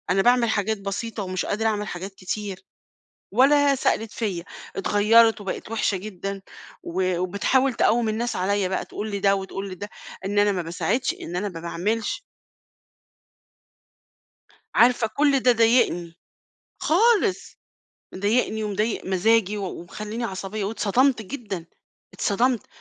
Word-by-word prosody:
أنا 190 +2 +3
باعمل 240 +1 +4
حاجات 220 0 0
بسيطة 200 +2 -4
ومش 185 -1 -3
قادرة 220 +2 0
أعمل 210 -1 -1
حاجات 190 +1 -6
كتير، 195 +1 -5 0.7
ولا 280 +5 +5
سألِت 225 -4 0
فيَّ. 195 -7 -3 0.3
اتغيرت 220 +3 +4
وبقِت 195 +2 -5
وحشة 215 -3 0
جدًا 195 0 -6 0.4
و 185 +1 -1
وبتحاول 210 +9 +1
تقوِّم 230 0 +2
الناس 230 +2 -2
عليَّ 190 +1 0
بقى 190 - -2
تقول 215 +1 -5
لده 200 0 +2
وتقول 195 0 -5
لده 205 +3 -7 0.4
إن 205 +1 +1
أنا 205 0 +4
ما 185 -2 -1
باساعدش، 195 +10 -1
إن 175 - -6
أنا 205 +3 -1
ما 165 -3 -8
باعملش. 205 - -2 2.5
عارفة 240 -1 +5
كل 280 +3 +2
ده 250 -1 +4
ضايقني، 225 -8 +2 0.6
خالص! 420 +3 +2 0.6
مضايقني 215 +2 0
ومضايق 210 +2 -1
مزاجي 210 +2 +2
و 200 - -3 0.2
ومخلّيني 215 +6 -6
عصبية 195 0 -4
واتصدمت 225 +4 +2
جدًا، 205 -7 -6 0.5
اتصدمت، 240 +3 +1
210 Hz, 125 wpm, -24 LUFS, 190-230 Hz, 2.5 s, ولا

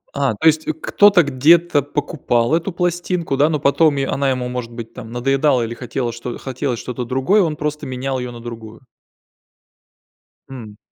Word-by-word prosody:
А, 140 -5 0
то - - -3
есть 155 0 +3
кто-то 205 -4 +5
где-то 150 +3 +3
покупал 140 -4 -1
эту 170 +4 0
пластинку, 175 -2 -1
да, 145 +3 +3
но 150 - -1
потом 145 +2 +3
е 135 -1 0
она 140 0 0
ему 125 -1 -1
может 125 -1 -5
быть 115 -1 -9
там 115 -3 -9
надоедала 135 +1 +1
или 115 +1 -4
хотело 120 0 -4 0.3
хотелось 130 -2 -3
что-то 125 0 -5
другое, 135 - +2
он 160 -4 0
просто 150 -1 -4
менял 130 +1 -3
её 125 -1 -5
на 120 - -10
другую. 115 0 -10 1.7
М. 110 -6 -10
135 Hz, 165 wpm, -19 LUFS, 120-155 Hz, 1.7 s, кто-то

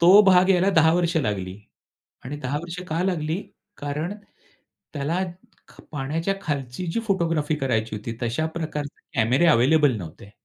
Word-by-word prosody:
तो 185 +5 +8
भाग 185 -1 +5
याला 190 +1 +4
10 160 0 +6
वर्ष 170 -1 +1
लागली 100 -8 -1 0.7
आणि 145 +3 -5
10 140 +2 -2
वर्ष 170 +1 -7
का 165 +3 0
लागली? 165 -1 -1 0.4
कारण 150 +6 -3 0.8
त्याला 150 +6 -1 0.5
ख - - -16
पाण्याच्या 155 +7 -1
खालची 140 +2 -3
जी 230 - 0
फोटोग्राफी 165 -6 +1
करायची 115 -6 -1
होती 115 +2 -6
तशा 125 +7 0
प्रकारचे 155 -3 -5 0.2
कॅमेरे 125 +9 +4
अवेलेबल 145 -2 +4
नव्हते. 95 +2 -9
155 Hz, 145 wpm, -24 LUFS, 130-170 Hz, 0.8 s, तो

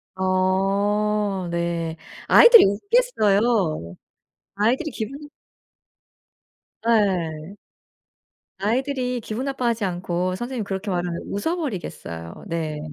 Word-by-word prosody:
아 195 +1 0
네. 170 -1 -2 0.3
아이들이 470 -2 +9
웃겠어요. 205 - +1 0.6
아이들이 250 +10 +1
기분 275 +7 -6 1.6
예. 185 -6 0 1.0
아이들이 250 +4 -1
기분 225 +4 -5
나빠하지 240 -5 -1
않고 180 0 -2
선생님이 240 -1 -4
그렇게 195 +1 -4
말하면 175 -1 -2
웃어버리겠어요. 200 - -5
네. 160 -2 -3
200 Hz, 220 characters per minute, -23 LUFS, 175-240 Hz, 1.6 s, 아이들이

